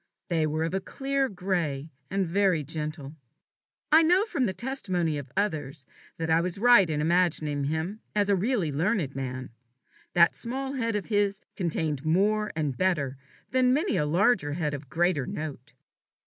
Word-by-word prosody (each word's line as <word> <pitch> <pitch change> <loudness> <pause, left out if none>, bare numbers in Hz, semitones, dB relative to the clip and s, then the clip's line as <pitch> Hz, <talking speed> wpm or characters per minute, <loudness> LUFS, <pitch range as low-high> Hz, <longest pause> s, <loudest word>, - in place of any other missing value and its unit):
They 160 -3 +1
were 155 +1 -1
of 165 - -2
a 190 - +1
clear 275 +4 -1
gray, 170 -6 -2 0.2
and 195 0 0
very 180 -2 +2
gentle. 150 -1 -5 0.8
I 315 +2 +8
know 355 +5 +4
from 275 - 0
the - - 0
testimony 185 - -1
of 140 -2 -9
others, 150 -9 -2 0.3
that 165 - -2
I 160 +1 +3
was 180 +1 -2
right 225 -5 +6
in 150 -1 -1
imagining 155 -4 +1
him 160 +8 -3
a 205 -1 +3
really 195 - 0
learned 160 - 0
man. 130 -2 -5 0.6
That 170 -1 +5
small 265 +3 -3
head 230 -4 -1
of 205 - -2
his 205 -1 +1
contained 160 -5 -1
more 210 +6 +2
and 150 -5 -1
better 150 -7 0 0.4
than 255 0 +3
many 320 +6 +1
a 150 - +1
larger 175 -2 +2
head 150 -2 -2
of 140 -1 -7
greater 165 -2 +1
note. 145 -3 -6
175 Hz, 160 wpm, -27 LUFS, 150-210 Hz, 0.8 s, I